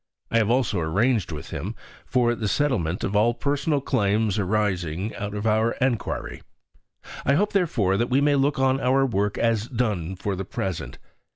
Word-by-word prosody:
I 115 - +4
have 110 -1 +1
also 120 -5 +1
arranged 100 +6 +1
with 75 - -7
him - - -4 0.3
for 120 -2 +2
the 110 -2 -3
settlement 100 - 0
of 100 - -2
all 115 +3 +3
personal 145 +1 0
claims 105 -4 +1
arising 95 -2 -1
out 105 0 -5
of 105 +1 -4
our 110 +1 +2
enquiry. 125 -4 -2 0.8
I 140 - +3
hope, 205 +6 +1
therefore, 120 - +1
that 120 +3 0
we 130 +2 +3
may 145 0 +3
look 140 +1 +2
on 135 0 +2
our 135 +2 +3
work 105 -4 -1
as 115 -1 +1
done 105 -9 -2
for 95 +1 -3
the 95 - -4
present. 95 -2 -4
110 Hz, 175 wpm, -24 LUFS, 100-130 Hz, 0.8 s, I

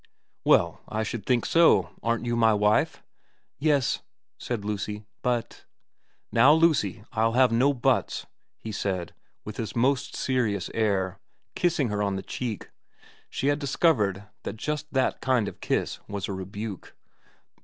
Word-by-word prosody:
' - - -49
Well, - - +3
I 110 +1 -2
should 110 -2 -5
think 125 -3 +2
so. 165 0 +4
Aren't 115 +1 0
you 120 0 0
my 115 -2 +4
wife? 105 +1 +2 0.2
' - - -41
* - - -57
Yes,' 145 -3 +2 0.4
said 115 -5 -4
Lucy. 105 0 -3
' - - -52
But 120 -2 -2 0.2
' - - -48
' - - -45
Now, 130 +6 +6
Lucy, 150 - +2
I'll 115 +1 +1
have 125 -1 +5
no 125 +5 +4
buts,' 130 -4 0 0.3
he 110 - -7
said, 95 -4 -3 0.3
with 105 - -7
his 110 -3 -4
most 135 +3 +1
serious 120 -6 0
air, 100 -4 0 0.3
kissing 165 -8 +1
her 105 0 -1
on 100 -1 0
the 95 - -4
cheek, 120 -5 -5 0.6
she 135 - -1
had 145 +1 +1
discovered 125 - +1 0.2
that - - -6
just 150 +5 -3
that 130 -1 0
kind 125 -5 +2
of - - -8
kiss - - -1
was 100 -1 -4
a 100 - -3
rebuke. 100 +1 -6
115 Hz, 165 wpm, -26 LUFS, 105-130 Hz, 0.6 s, Now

